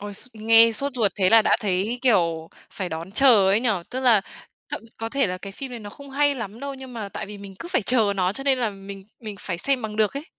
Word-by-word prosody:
Ôi 205 0 -7
s 200 - 0
nghe 225 +1 +5
sốt 275 +5 -1
ruột 220 -5 +1
thế 190 -3 +2
là 225 +2 +6
đã - - +3
thấy, 205 +4 -1
kiểu, 170 -10 +2 0.2
phải 185 -3 -5
đón 165 +2 -6
chờ 220 -5 +6
ấy 205 +3 +3
nhỉ, 245 - 0 0.2
tức 255 - -4
là 240 -5 +5 0.5
thậm - - -5
có 225 - -4
thể 275 +2 +1
là 185 -1 -4
cái 195 +1 -8
phim 265 +6 -7
đấy 240 -2 -7
nó 205 -1 -9
không 280 +5 -13
hay 285 +1 +2
lắm 230 -3 -7
đâu, 280 0 -5
nhưng 265 -1 -10
mà 220 -4 -5
tại - - -6
vì 205 0 -9
mình 200 -1 -10
cứ 345 - -7
phải 310 - 0
chờ 220 -2 +2
nó 185 0 +1
cho 270 +6 -7
nên 270 -2 +3
là 235 -3 0
mình 195 -1 -10 0.2
mình 215 -3 -7
phải 175 -3 -4
xem 270 +4 0
bằng 215 -1 -5
được 215 -1 +2
ấy. 285 - -5
220 Hz, 275 wpm, -23 LUFS, 195-255 Hz, 0.5 s, là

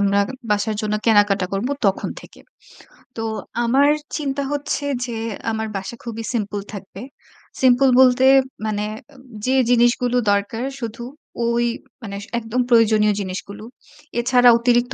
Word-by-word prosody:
আমরা 200 0 +2 0.3
বাসার 210 +1 0
জন্য 210 0 -1
কেনাকাটা 205 -3 +4
করব 195 +6 -1 0.2
তখন 195 - 0
থেকে। - - -16 0.8
তো 225 - -3 0.4
আমার 270 +5 +4 0.3
চিন্তা 280 -2 -2
হচ্ছে 290 0 -2 0.2
যে, 240 -2 -5 0.4
আমার 220 0 -3
বাসা 190 +4 -6
খুবই 230 -1 -6
সিম্পল 205 -3 -2
থাকবে। 195 -1 -9 0.6
সিম্পল 260 +1 +5
বলতে 255 0 +5 0.4
মানে 210 -1 -1
অ্যা 290 +5 -18 0.3
যে 260 +1 +2
জিনিসগুলো 245 0 +3
দরকার, 200 +4 -1 0.2
শুধু 230 0 -6 0.4
ঐ - - +1 0.6
মানে 200 -2 -6 0.2
একদম 230 +2 -2
প্রয়োজনীয় 215 -3 +4
জিনিসগুলো 200 +2 -6 0.6
এছাড়া 245 0 +5
অতিরিক্ত 240 +2 +1
230 Hz, 130 wpm, -21 LUFS, 205-250 Hz, 0.8 s, সিম্পল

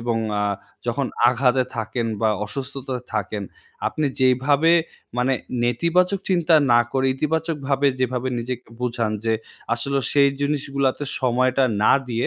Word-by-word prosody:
এবং 115 0 -1 0.2
আ - - +1 0.4
যখন 130 +3 0 0.2
আঘাতে 125 +1 +3
থাকেন, 115 +1 -2
বা 110 - +3 0.2
অসুস্থতায় 130 +2 -5
থাকেন, 105 0 -2 0.4
আপনি 155 - -1
যেইভাবে 130 +5 +3 0.5
মানে 125 +2 +2 0.3
নেতিবাচক 175 - +2
চিন্তা 175 -3 +3 0.2
না 120 - +6
করে, 135 0 +1
ইতিবাচকভাবে 145 -2 0
যেভাবে 130 0 0
নিজেকে 125 +1 -5
বোঝান, 120 -3 -1
যে 115 - +2 0.4
আসলেও 135 +3 -1
সেই 140 -1 +5
জিনিসগুলোতে 140 -1 0 0.2
সময়টা 130 +1 +2 0.2
না - - +6 0.2
দিয়ে, 120 0 -1
130 Hz, 125 wpm, -22 LUFS, 120-140 Hz, 0.5 s, না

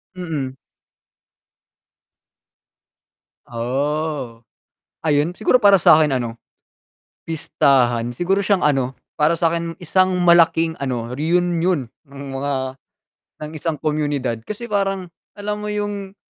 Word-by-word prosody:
Mm. 150 -7 -4 2.9
Oh, 130 0 -3 0.6
Ayun 150 +1 +2
siguro 220 +5 +3
para 200 -1 +7
sa 155 - +7
'kin 150 -2 +3
ano, 120 -2 -3 0.9
pistahan 125 -7 +2
siguro 180 +8 +1
siyang 200 -1 +1
ano, 135 -3 +1 0.2
para 150 +3 +4
sa 165 -1 +2
'kin 170 0 -3
isang 185 +2 +2
malaking 165 -1 +4
ano, 125 -4 -3
reunion 170 0 +1 0.2
ng 140 0 -10
mga 140 +1 -2 0.9
ng 150 - -6
isang 155 +1 -2
komunidad, 145 -6 -1
kasi 225 +3 -5
parang 195 -3 -1 0.2
alam 210 0 -4
mo 210 - -5
yung, 205 -2 -4
160 Hz, 105 wpm, -20 LUFS, 135-185 Hz, 2.9 s, para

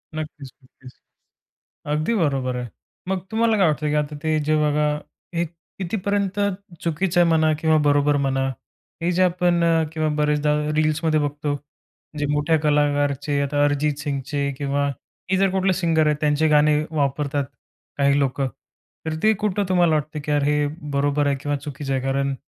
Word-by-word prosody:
नक्कीच, 150 -3 -6
नक्कीच. 130 0 -16 1.0
अगदी 155 +10 0
बरोबर 135 - 0
आहे. 125 -1 -4 0.4
मग 190 -1 0
तुम्हाला 225 0 +2
काय 195 - +4
वाटतं, 150 0 -1
की 150 - 0
आता 150 0 -5
ते 155 - +1 0.2
जे 155 - +3
बघा 150 0 +2 0.5
हे 170 - +2 0.4
कितीपर्यंत 200 +1 -1 0.5
चुकीचं 170 +2 +1
आहे 175 - +5
म्हणा 160 -1 +3
किंवा 160 -1 +4
बरोबर 145 0 +3
म्हणा. 135 0 0 0.6
हे 170 - +1
जे - - +5
आपण 175 -1 +2 0.3
किंवा 155 -1 0
बरेचदा 150 0 +2 0.3
रील्समध्ये 155 0 +2
बघतो 145 0 -2 0.6
जे 145 - 0
मोठ्या 150 +2 +2
कलाकारचे, 145 -1 +1
आता 145 +1 +1
अरिजित 145 +1 +1
सिंगचे 140 +1 -2 0.2
किंवा 140 0 0 0.4
हे 190 - +3
जर 195 0 +3
कुठले 190 0 +1
सिंगर 165 -4 +2
आहेत 150 - +2
त्यांचे 150 +1 +2
गाणे 150 0 +4 0.2
वापरतात, 145 -1 -1 0.5
काही 140 0 +3
लोकं. 135 0 0 0.6
तर 160 - -1
ते 220 - +5
कुठं 205 -1 +1
तुम्हाला 175 -3 +3
वाटतं 150 0 -2
की 150 - -4
यार 145 -1 +2
हे 150 0 +2 0.3
बरोबर 145 +1 +1
आहे 140 -1 +1
किंवा 145 0 -1
चुकीचं 140 -1 -4
आहे 130 -1 0
कारण 135 +1 0
150 Hz, 160 wpm, -22 LUFS, 145-165 Hz, 1.0 s, आहे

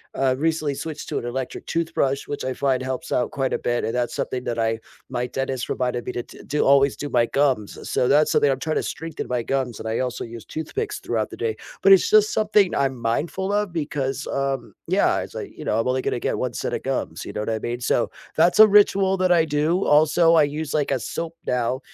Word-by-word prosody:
I 135 -1 +2
recently 150 +1 0
switched 150 +2 -6
to - - -2
an - - -7
electric 125 +1 -4
toothbrush 140 -4 -1
which 145 - -4
I 130 - -1
find 130 -1 0
helps 130 0 -4
out 125 - 0
quite 135 -1 -1
a - - +1
bit, 120 -2 -1
and 115 - -2
that's 120 -1 -1
something 125 -1 -3
that 120 -1 -2
I 115 0 0 0.3
my 120 - -2
dentist 135 -1 -3
reminded 125 -1 -1
me - - -3
to 120 - -2
d - - -15
do 150 +1 +1
always 140 0 +5
do 145 - -4
my 120 -3 +3
gums, 135 -7 0
so 125 - +1
that's 150 +2 +4
something 145 - +4
I'm 135 - -2
trying 155 +3 -2
to - - 0
strengthen 165 -1 -5
my 125 -1 0
gums 130 -2 -2
and 110 - -6
I 110 - -1
also 125 -1 -2
use 115 -1 -9
toothpicks 415 - -4
throughout - - -2
the - - -10
day, 450 -1 -1 0.3
but 395 - +8
it's, 390 +4 +4
just, 430 0 +5
something 210 - +3
I'm 135 -2 0
mindful 170 - -1
of 205 -2 0
because, 145 -4 -2
um, 135 -3 -2
yeah, - - +2
it's - - -8
like, - - -7
you - - -7
know, 110 - +1
I'm 115 - 0
only 130 +1 +1
gonna - - -1
get - - -1
one - - -2
set - - -3
of - - -3
gums, - - -3
you - - -6
know - - -4
what 105 - -3
I 110 - -1
mean, 120 +2 -4
so, - - +1 0.3
that's 170 +5 +4
a 215 - +11
ritual 195 -2 +4
that 185 -1 +2
I 165 -2 +5
do. 155 +5 +1
Also, 155 +3 +4
I 160 - +6
use, 150 +1 -3
like, 150 -2 0
a 135 - +1
soap 165 +8 -5
now 125 +1 0
140 Hz, 245 wpm, -23 LUFS, 125-165 Hz, 0.3 s, a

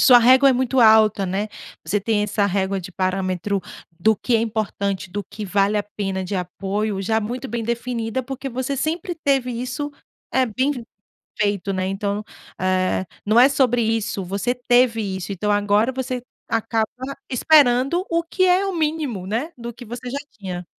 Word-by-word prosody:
Sua 250 -4 +8
régua 260 +3 +6
é - - +5
muito 260 +1 +1
alta, 220 -3 +5
né. 195 +4 -2 0.4
Você 200 +6 0
tem 210 0 +1
essa 210 -1 +1
régua 195 0 0
de 185 +1 -9
parâmetro 185 +1 -1 0.4
do 220 +5 +4
que 235 +4 +1
é - - +1
importante, 205 -3 -2
do 205 +2 -3
que 215 - -7
vale 200 +1 +2
a 205 - +1
pena 195 -2 -4
de 195 - -4
apoio, 195 +3 -2
já 220 +3 +1
muito 245 +5 -4
bem 230 +1 -3
definida, 235 +1 -2
porque 270 +1 -5
você 260 +2 -3
sempre 325 +5 -2
teve 275 -5 +1
isso, 250 +4 -4 0.4
eh, 260 -1 +3
bem 260 +6 0
f 250 -5 -4 0.6
feito, 205 -1 0
né. 185 0 -1
Então, 200 +2 -2 0.4
eh, 185 0 +1 0.2
não 215 +3 +4
é 255 - +8
sobre 250 -3 +2
isso, 220 -3 -1
você 200 +6 -1
teve 245 -2 +3
isso, 190 -2 -4
então 205 +2 -1
agora 205 +3 +2
você 255 -1 -3 0.3
acaba 225 -1 0 0.4
esperando 275 +4 +4
o 335 0 +1
que 370 +3 0
é 365 +2 +4
o 390 -2 -2
mínimo, 300 - -1
né, 235 - -2
do 235 0 -6
que 245 - -11
você 240 +2 -6
já 275 - -3
tinha. 180 -4 -6
225 Hz, 180 wpm, -22 LUFS, 200-255 Hz, 0.6 s, Sua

